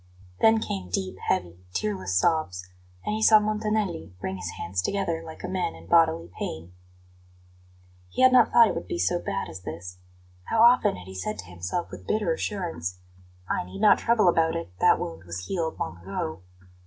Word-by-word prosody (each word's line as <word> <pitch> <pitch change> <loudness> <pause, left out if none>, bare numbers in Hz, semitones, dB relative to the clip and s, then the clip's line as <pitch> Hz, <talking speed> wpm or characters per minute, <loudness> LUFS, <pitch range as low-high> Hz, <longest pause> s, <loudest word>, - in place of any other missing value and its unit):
Then 220 0 +5
came 95 - -4
deep, 95 +1 -3
heavy, 90 +1 -2
tearless 195 - -2
sobs; 95 - +1 0.4
and 210 - -1
he 215 - -2
saw 220 0 +8
Montanelli 210 - -1
wring 95 0 -4
his - - -5
hands 95 0 -2
together 170 - -1
like 160 -1 -10
a - - -3
man 180 - -2
in 80 0 -13
bodily 165 - +3
pain. 85 +3 -5 1.4
He 255 - 0
had 255 0 +7
not 245 -3 +6
thought 235 -1 +7
it - - -1
would 85 - -5
be - - -3
so 90 +2 +1
bad - - -3
as 95 - -9
this. 90 +2 -8 0.5
How 225 0 +3
often 240 - +5
had 90 -1 -10
he 95 - -9
said 95 +3 -4
to 95 - -7
himself 90 - -4
with - - -10
bitter 210 -6 +1
assurance: 165 - -3 0.5
"I - - -1
need 90 - -9
not 210 -2 +6
trouble 230 -4 +3
about 165 -1 +3
it; 165 - -5
that - - +5
wound 80 0 -5
was 90 +1 -6
healed 165 -4 -2
long 85 +1 -4
ago." 85 -3 -4
160 Hz, 190 wpm, -26 LUFS, -, 1.4 s, saw